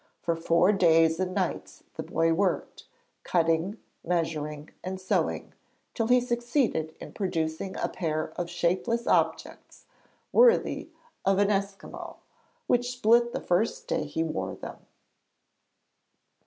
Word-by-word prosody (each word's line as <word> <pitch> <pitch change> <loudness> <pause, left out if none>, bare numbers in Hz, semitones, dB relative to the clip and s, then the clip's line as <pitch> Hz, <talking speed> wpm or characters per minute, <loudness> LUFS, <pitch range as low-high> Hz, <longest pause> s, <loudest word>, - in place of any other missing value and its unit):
For 170 - +1
four 170 +3 +3
days 165 -4 +4
and 185 -1 -1
nights 185 -3 -3
the - - -5
boy 165 0 +1
worked, 190 +2 -1 0.4
cutting, 165 +4 +1 0.3
measuring 155 -3 -2
and 185 +1 -4
sewing, 185 - -1 0.4
till 225 - -1
he 250 +1 +5
succeeded 240 - -1
in - - -9
producing 170 -1 -2
a - - 0
pair 155 -2 -3
of 175 -1 -3
shapeless 185 +8 0
objects, - - -1 0.5
worthy 480 0 +4 0.3
of 195 0 +3
an 205 +1 +3
Esquimaux, 200 0 -4 0.5
which 245 0 +1
split 235 0 +4
the - - -3
first 225 - 0
day - - -1
he 160 - -2
wore 95 -13 -3
them. - - -8
185 Hz, 125 wpm, -28 LUFS, 165-225 Hz, 0.5 s, he